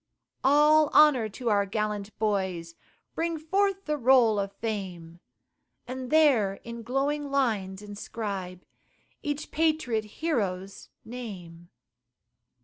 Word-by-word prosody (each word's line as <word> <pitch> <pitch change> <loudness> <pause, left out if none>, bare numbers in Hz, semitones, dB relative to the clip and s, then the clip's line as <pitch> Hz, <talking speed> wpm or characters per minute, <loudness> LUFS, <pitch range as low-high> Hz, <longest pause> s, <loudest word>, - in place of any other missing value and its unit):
All 300 +2 +5
honor 275 -8 +6
to 235 +2 -3
our 200 -1 +2
gallant 210 0 -3
boys, 190 -6 -1 0.4
Bring 330 0 -1
forth 390 +5 0
the 300 -1 -1
roll 235 -4 +5
of 200 0 -2
fame, 185 -6 -5 0.7
And 255 0 -5
there 265 -11 +4
in 235 0 -7
glowing 280 +4 -1
lines 210 -8 -1
inscribe 200 -3 -6 0.6
Each 295 +1 -4
patriot 305 -9 0
hero's 200 - -3 0.2
name. 180 -8 -9
225 Hz, 105 wpm, -27 LUFS, 195-290 Hz, 0.7 s, honor